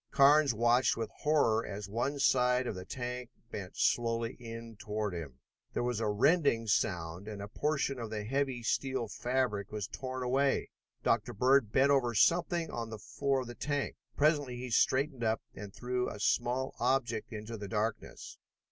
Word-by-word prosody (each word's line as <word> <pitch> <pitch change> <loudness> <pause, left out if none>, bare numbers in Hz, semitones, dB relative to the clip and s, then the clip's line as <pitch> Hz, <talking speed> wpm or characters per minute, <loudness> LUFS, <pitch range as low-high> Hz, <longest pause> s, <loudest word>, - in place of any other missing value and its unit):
Carnes 145 +1 +6
watched 120 +3 +3
with 115 -1 -3
horror 145 -7 +3
as 105 -2 -6
one 120 +8 -1
side 125 -2 +3
of - - -2
the 90 -1 -7
tank 125 +1 -5 0.2
bent 95 -2 -7
slowly 115 0 +1
in 115 -1 -8
toward 105 -1 -3
him. 75 -7 -6 0.4
There - - 0
was 120 -2 -1
a 115 - 0
rending 115 +2 +3
sound, 90 -3 -1
and 105 -2 -6
a 100 - -5
portion 140 +2 -1
of 115 -2 -5
the 105 -1 -4
heavy 130 +1 -1
steel 130 0 0
fabric 120 -3 -1
was 105 -2 -3
torn 130 -1 -5
away. 135 +2 +1 0.3
Dr. 120 +1 +1
Bird 125 0 +3
bent 140 +4 +4
over 125 -4 +2
something 170 - +3
on 115 -1 -4
the 110 - -6
floor 135 +6 -1
of 125 - -7
the 120 - -7
tank. 145 +2 -2 0.2
Presently 145 -4 +2
he 125 0 -6
straightened 130 +2 +2
up 110 -1 0
and 100 0 -8
threw 125 +3 -2
a 105 - -8
small 125 +5 +1
object 120 -3 0
into 110 +1 -6
the 105 -2 -6
darkness. 110 +2 -3
120 Hz, 175 wpm, -32 LUFS, 110-135 Hz, 0.4 s, Carnes